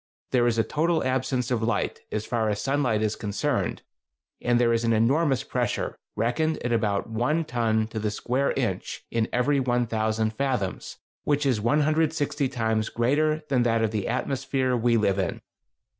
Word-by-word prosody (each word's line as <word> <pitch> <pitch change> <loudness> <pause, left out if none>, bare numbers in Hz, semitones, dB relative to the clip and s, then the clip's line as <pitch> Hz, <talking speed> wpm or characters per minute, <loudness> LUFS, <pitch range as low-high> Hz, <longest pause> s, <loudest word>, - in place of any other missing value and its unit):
There 120 -2 +3
is 115 -1 +1
a 115 - +4
total 160 +4 0
absence 130 -1 -1
of 120 -3 +1
light, 110 -3 -1
as 105 0 -2
far 115 -3 0
as 100 -1 -1
sunlight 125 -3 +1
is 110 0 0
concerned, 115 +7 -2 0.6
and 120 0 +2
there 120 -1 +3
is 115 0 +1
an 115 0 +2
enormous 135 +5 +2
pressure, - - -2 0.2
reckoned 155 +7 0
at 120 - 0
about 105 -3 0
one 125 +9 0
ton 115 -4 +1
to 110 - -4
the 105 0 -1
square 125 +6 0
inch - - -3
in 115 -1 0
every 130 +3 +2
1000 110 -3 0
fathoms, 125 -7 -2 0.3
which 145 0 +1
is 125 -6 +1
160 150 +2 +1
times 110 -3 0
greater 155 +6 +1
than 130 -3 +3
that 115 -1 +2
of 110 - +1
the 105 -3 -2
atmosphere 130 +1 -1
we 120 0 +2
live 100 -3 +1
in. 95 - -1
120 Hz, 170 wpm, -26 LUFS, 110-140 Hz, 0.6 s, a